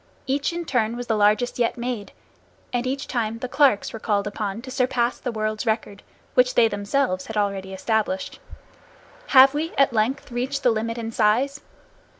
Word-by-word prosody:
Each 275 +3 0
in 340 0 -4
turn 235 -5 0
was 245 - -5
the 225 -1 0
largest 215 +4 +2
yet 235 0 +1
made, 235 -4 -4 0.6
and 245 +1 -1
each 270 +1 -3
time 230 -3 -2
the 255 - -5
Clarks 270 -5 +2
were 225 - -6
called 205 -2 0
upon 210 +1 -4
to 260 - -8
surpass 250 -2 0
the 245 - -3
world's 215 +1 -3
record, 215 -2 -2 0.3
which 250 0 +3
they 230 - +6
themselves 205 -1 -1
had 220 - -5
already 195 -2 -1
established. 220 +8 -2 0.9
Have 265 0 +7
we 315 +3 -3
at 275 -2 +4
length 240 +5 0
reached 265 +4 -2
the 245 - +5
limit 230 +1 -2
in 225 -1 -4
size? 245 +7 +1
235 Hz, 175 wpm, -23 LUFS, 215-260 Hz, 0.9 s, Have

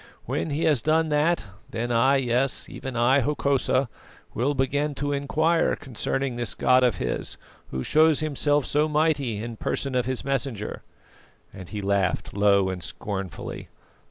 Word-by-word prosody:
When - - -2
he 150 +2 -1
has 145 -7 +3
done 160 +1 +2
that, 150 +2 +2 0.2
then 120 -1 -3
I, 125 +4 +4
yes, 130 0 +1
even 130 -2 -7
I, 120 +4 +4
Hokosa, 140 -1 +1 0.5
will 135 +6 0
begin 145 +2 0
to 145 +1 -2
inquire 155 +4 +1
concerning 135 0 -3
this 120 -1 -2
God 130 0 +4
of 120 -6 +3
his, - - -3 0.3
who 65 0 -3
shows 155 -1 +4
Himself 145 -2 +1
so 150 +2 +1
mighty 150 -7 +1
in 115 -1 -6
person 135 +4 -2
of 125 -1 0
His 130 -1 -2
messenger." 135 -6 -2 0.7
And 95 -2 -10
he 105 -2 -5
laughed 100 -3 0
low 100 -2 +4
and 90 -1 -4
scornfully. 95 +1 -6
135 Hz, 155 wpm, -25 LUFS, 115-145 Hz, 0.7 s, I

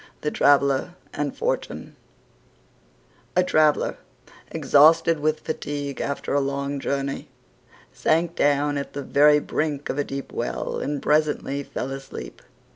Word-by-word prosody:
THE 150 - -1
TRAVELLER 140 +4 +3 0.2
AND 145 -1 -3
FORTUNE - - -3 1.4
A 180 - +4
Traveller, 155 -4 +2 0.5
exhausted 160 +2 +4
with 155 +1 0
fatigue 145 -3 -4
after 140 -1 -3
a 140 - +3
long 140 +1 -2
journey, 140 0 -3 0.6
sank 170 +1 +1
down 145 0 +2
at 140 - -7
the 140 - -4
very 150 +2 +5
brink 150 -1 -2
of 140 - -4
a - - +2
deep 135 0 -6
well 60 - -3
and 145 0 -3
presently 150 -2 +1
fell 135 -1 -5
asleep. 135 - -8
145 Hz, 125 wpm, -24 LUFS, 140-155 Hz, 1.4 s, very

